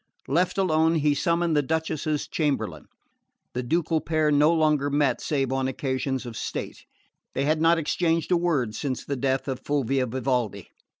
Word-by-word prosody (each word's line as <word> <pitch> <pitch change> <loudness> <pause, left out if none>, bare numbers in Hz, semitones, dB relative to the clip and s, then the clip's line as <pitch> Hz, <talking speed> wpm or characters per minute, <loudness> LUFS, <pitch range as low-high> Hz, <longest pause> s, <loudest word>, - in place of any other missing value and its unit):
Left 175 +8 +1
alone, 160 -3 +3
he 150 -2 +2
summoned 170 +2 +1
the 145 - +4
Duchess's 155 0 -2
chamberlain. 150 -3 -2 0.7
The 125 - -2
ducal 160 +4 0
pair 155 0 +1
no 150 +2 +5
longer 155 -3 +2
met 140 -3 +1
save 135 -4 -1
on 135 0 0
occasions 130 0 -2
of 120 -2 -7
state: - - -5 0.5
they 135 - 0
had 155 +1 +1
not 165 +1 +5
exchanged 165 +1 0
a - - +5
word 150 -11 0
since 130 +1 -3
the 140 - -2
death 130 +1 -1
of 130 -2 -3
Fulvia 135 -2 0
Vivaldi. 120 -5 -2
145 Hz, 165 wpm, -25 LUFS, 130-160 Hz, 0.7 s, no